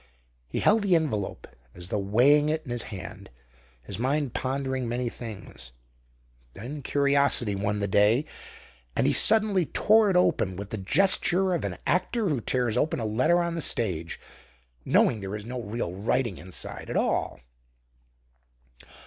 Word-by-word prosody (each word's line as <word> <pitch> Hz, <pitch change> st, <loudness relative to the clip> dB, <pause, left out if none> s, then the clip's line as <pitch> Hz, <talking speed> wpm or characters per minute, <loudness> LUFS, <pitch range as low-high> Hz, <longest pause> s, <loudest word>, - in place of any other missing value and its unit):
He -, -, -3 dB
held 220 Hz, +1 st, +4 dB
the 195 Hz, -3 st, +3 dB
envelope 135 Hz, -12 st, -2 dB, 0.3 s
as 90 Hz, +1 st, -7 dB
though 105 Hz, -, -1 dB
weighing 130 Hz, +10 st, +3 dB
it 155 Hz, +1 st, -1 dB
in 125 Hz, -, -7 dB
his 120 Hz, -1 st, -1 dB
hand, 100 Hz, -4 st, -9 dB, 0.5 s
his 95 Hz, -, -7 dB
mind 135 Hz, 0 st, -1 dB
pondering 130 Hz, -2 st, -2 dB
many 120 Hz, 0 st, -2 dB
things. 105 Hz, -, -9 dB, 0.8 s
Then 135 Hz, +8 st, -7 dB
curiosity 140 Hz, -5 st, +2 dB
won 100 Hz, +1 st, -2 dB
the 100 Hz, -, 0 dB
day, 105 Hz, +8 st, +3 dB, 0.7 s
and -, -, +1 dB
he -, -, +3 dB
suddenly 210 Hz, -6 st, +4 dB
tore 215 Hz, 0 st, +3 dB
it 190 Hz, -, 0 dB
open 165 Hz, -, +2 dB
with 100 Hz, +2 st, -8 dB
the 110 Hz, -, -3 dB
gesture 190 Hz, -, +3 dB
of 170 Hz, -, -2 dB
an -, -, -4 dB
actor 205 Hz, +3 st, 0 dB
who 140 Hz, -6 st, -1 dB
tears 125 Hz, -1 st, -1 dB
open 155 Hz, -, 0 dB
a 115 Hz, -, -3 dB
letter 130 Hz, +11 st, +2 dB
on 170 Hz, 0 st, -2 dB
the 165 Hz, -, -3 dB
stage, 85 Hz, -, -2 dB, 0.7 s
knowing 110 Hz, -, +3 dB
there 95 Hz, +1 st, -5 dB
is 105 Hz, 0 st, -7 dB
no 125 Hz, +1 st, -5 dB
real 105 Hz, -4 st, -4 dB
writing 110 Hz, -, -1 dB
inside 90 Hz, +2 st, -7 dB
at -, -, -2 dB
all. -, -, -1 dB
125 Hz, 155 wpm, -26 LUFS, 105-155 Hz, 0.8 s, held